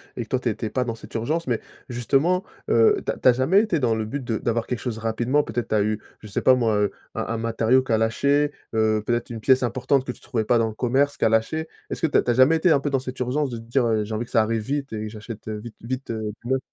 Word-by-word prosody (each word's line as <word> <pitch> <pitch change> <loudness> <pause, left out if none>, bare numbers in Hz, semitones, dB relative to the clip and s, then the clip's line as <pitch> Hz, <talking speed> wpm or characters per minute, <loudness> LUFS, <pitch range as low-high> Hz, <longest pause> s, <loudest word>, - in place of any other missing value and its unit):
et 120 - -3
que 110 - -15
toi 130 - +1
tu 125 - -1
étais 110 0 -3
pas 130 - 0
dans 115 -2 -3
cette 115 - -13
urgence, 155 +9 -1
mais 120 -3 0 0.3
justement, 135 - +1 0.3
heu, 420 -2 +5
tu - - +1
as - - -6
tu - - +1
as 125 - +8
jamais 135 +11 +4
été 210 -7 0
dans 120 -4 +2
le 110 0 -2
but 135 +5 -4
de 115 -2 -1
d'avoir 115 0 -1
quelque 125 - -3
chose 115 +1 -4
rapidement? 120 +6 +1
Peut-être 115 0 -3
tu - - +1
as 105 - +3
eu, 110 +1 -1 0.2
je 110 - -11
sais 100 - -2
pas 130 - +6
moi, 115 -4 +1
heu, 105 -1 +1 0.2
un - - -3
un 115 - -2
matériau 115 +3 +2
qui 130 - -5
a 110 - +4
lâché, 140 +6 +2 0.2
heu, 110 -1 +2
peut-être 120 0 -1
une 115 -2 -5
pièce 130 +3 +4
importante 130 +3 +1
que 125 - -3
tu - - -14
trouvais 115 -3 -2
pas 120 - +3
dans 115 -1 +2
le - - -7
commerce 130 +5 +1
qui - - +1
a - - +5
lâché. 135 +9 0 0.2
Est-ce - - -4
que - - +3
tu 145 - +2
as - - +3
tu 120 - +1
as - - +3
jamais 130 +6 +5
été 165 +2 +3
un 140 - +5
peu 145 - -2
dans 135 -1 +1
cette 130 0 -7
urgence 135 +3 0
de 120 - -4
te 115 - -9
dire, 120 +2 +1
heu: 110 -2 +1
«J'ai 110 - -6
envie 115 +3 -2
que - - -19
ça 110 - +4
arrive 110 +1 0
vite 140 +1 -3
et 110 0 -4
j'achète, 105 +1 -9
heu, 110 -1 -4
vite 115 +1 -10
vite, 130 +3 -5
heu, 110 -2 -3
du 120 - -7
neuf»? 130 - +3
120 Hz, 310 wpm, -24 LUFS, 110-135 Hz, 0.3 s, as